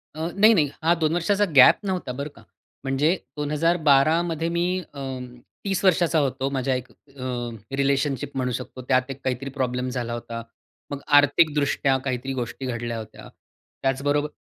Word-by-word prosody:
अ, 155 - -8 0.2
नाही, 215 +3 +6
नाही. 150 -7 +2
हा 165 +2 +5
2 155 +1 +2
वर्षाचा 200 +4 +2
गॅप 130 - +8
नव्हता 185 -9 -2
बरं 140 +3 -5
का. - - -15 0.4
म्हणजे 140 +6 +2 0.2
2012 150 0 +3
मध्ये 165 -1 -2
मी 175 +2 0
अं, 135 -2 -5 0.4
30 195 -1 -1
वर्षाचा 170 -3 +3
होतो. 135 -1 -1
माझ्या 130 -1 0
एक 125 0 -5
अ, 125 -3 -6 0.3
रिलेशनशिप 140 0 0
म्हणू 125 -1 0
शकतो. 130 +1 -6
त्यात 130 0 +2
एक 135 - -9
काहीतरी 130 +1 -2
प्रॉब्लेम 125 0 -1
झाला 120 -2 -3
होता. 115 -1 -6 0.5
मग 140 - -4 0.2
आर्थिक 145 +2 +4
दृष्ट्या 140 -2 +1
काहीतरी 130 +1 -2
गोष्टी 125 +1 -4
घडल्या 120 -2 -3
होत्या. 110 -1 -9 0.6
त्याच 135 0 0
बरोबर, 145 +1 +1
135 Hz, 160 wpm, -24 LUFS, 130-155 Hz, 0.6 s, गॅप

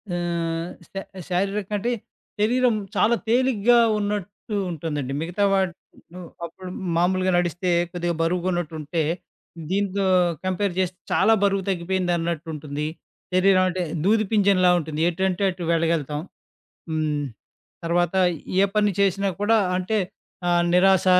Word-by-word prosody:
ఆహ్, 170 -1 -2 0.2
శా 195 - -4 0.3
శారీరక 195 +2 -1
అంటే 235 +5 -1 0.5
శరీరం 245 +2 +3 0.2
చాలా 235 +2 +4
తేలిగ్గా 240 -1 +4 0.2
ఉన్నట్టు 205 +1 -4 0.2
ఉంటుందండి. 150 -4 -3
మిగతా 175 +5 -1
వాటి 190 -2 +1 0.4
ను 180 - -8 0.3
అప్పుడు 180 +2 -9 0.3
మామూలుగా 185 +2 +2
నడిస్తే 175 +1 0 0.2
కొద్దిగా 175 -1 -1
బరువుగున్నట్టుంటే 170 -2 -1 0.7
దీంతో 195 0 0 0.4
కంపేర్ 185 +1 0
చేస్తే 185 -1 -1
చాలా 225 - +4
బరువు 195 -1 +2
తగ్గిపోయిందన్నట్టుంటుంది. 170 -5 -2 0.5
శరీరం 185 0 +5
అంటే 185 0 -2 0.2
దూది 215 +3 +3
పింజంలా 200 -4 +4
ఉంటుంది. 155 -1 -4
ఎటంటే 190 +2 -1
అటు 180 -1 -7
వెళ్ళగలుతాం. 160 -3 0 0.7
హ్మ్. 150 -2 -1 0.6
తర్వాత 175 +1 +1 0.5
ఏ 200 - +6
పని 210 -1 +4
చేసినా 195 0 +2
కూడా 225 +2 +4 0.2
అంటే 190 +4 0 0.5
ఆహ్, 175 0 +3
నిరాశ, 190 +1 +4
185 Hz, 115 wpm, -24 LUFS, 170-200 Hz, 0.7 s, ఏ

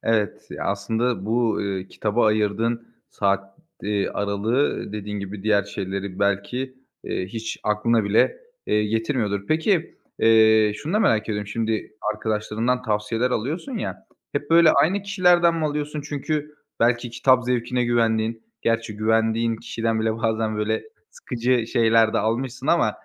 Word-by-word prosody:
Evet. 110 -3 0
Ya, - - -5
aslında 110 +1 -1
bu, 115 0 +1
ııı, 95 -2 -2
kitaba 110 +2 0
ayırdığın 110 +2 0 0.2
saat, 100 -1 -1 0.2
eee, 100 -1 0
aralığı, 105 +4 -1
dediğin 105 -1 -4
gibi, 100 0 -6
diğer 105 -2 +2
şeyleri 100 -1 -5
belki, 100 +7 -1 0.3
eee, 90 - -3
hiç 115 +4 -5
aklına 105 +1 +1
bile, 110 - +2 0.3
eee, 105 0 +2
getirmiyordur. 105 -2 -1
Peki, 160 +2 +1 0.2
eee, 110 -1 +5
şunu 155 - -5
da 210 - +3
merak 110 - +3
ediyorum, 105 -2 -3
şimdi 110 0 -2 0.2
arkadaşlarından 110 +3 -1
tavsiyeler 110 +2 0
alıyorsun 165 - -3
ya, 220 +1 -5 0.3
hep 145 +1 -3
böyle 165 -1 +7
aynı 190 +5 +2
kişilerden 180 -4 +4
mi 160 - -1
alıyorsun? 150 0 -2
Çünkü 150 +1 -3 0.3
belki 120 0 +2
kitap 125 +1 +3
zevkine 125 0 0
güvendiğin, 115 -1 +1 0.2
gerçi 115 -2 -1
güvendiğin 110 +1 +1
kişiden 115 0 -2
bile 110 0 0
bazen, 110 -1 -1
böyle, 110 +1 -1 0.3
sıkıcı 120 -1 -1
şeyler 115 -1 +3
de - - +2
almışsın 125 +5 -2
ama 170 +1 +3
115 Hz, 140 wpm, -23 LUFS, 105-125 Hz, 0.3 s, böyle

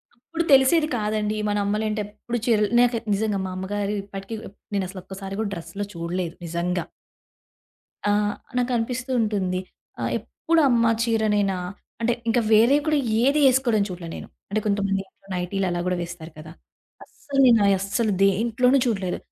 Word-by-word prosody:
అప్పుడు 325 +7 -4
తెలిసేది 275 +4 +5
కాదండి. 215 0 -1
మన 205 0 0
అమ్మలేంటో 215 +1 -1
ఎప్పుడు 225 +3 -5
చీరలు 215 -3 +3
నాకే 240 -1 +3
నిజంగా 205 0 0
మా 185 - -4
అమ్మగారు 205 +2 -2
ఇప్పటికి 195 +2 -7
ఎప్ 200 - -27 0.2
నేనసలు 185 -1 -3
ఒక్కసారి 195 +1 -7
గూడా 215 -2 -1
డ్రెస్‌లో 200 +4 -5
చూడలేదు 170 0 -3
నిజంగా. 170 +1 -1 1.3
ఆ! - - +4 0.5
నాకనిపిస్తూ 245 +1 -1
ఉంటుంది. 195 -4 0 0.4
ఆహ్, - - -1
ఎప్పుడు 330 0 0
అమ్మ 235 -2 +3 0.2
చీరనేనా? 210 -4 +1 0.4
అంటే 235 +1 +2 0.2
ఇంకా 235 +1 +3
వేరేవి 240 +7 +5
కూడా 305 - +3 0.3
ఏదీ 280 +3 +3
ఏసుకోడం 245 -5 +2
చూడలే 175 -2 -7
నేను. - - -8 0.2
అంటే 215 - 0
కొంతమంది 200 -1 +1
ఇంట్లో 195 - -28
నైటీ‌లు 180 +2 -1
అలా 175 0 -2
గూడా 180 - 0
వేస్తారు 170 -1 -8
గదా! 155 +1 -10 0.5
అస్సలు 280 -1 -5
నేనా 230 -5 +6
అస్సలు 205 +3 0
దేంట్లోనూ 230 +6 +3
చూడలేదు. 195 -6 -1
210 Hz, 145 wpm, -24 LUFS, 190-235 Hz, 1.3 s, నేనా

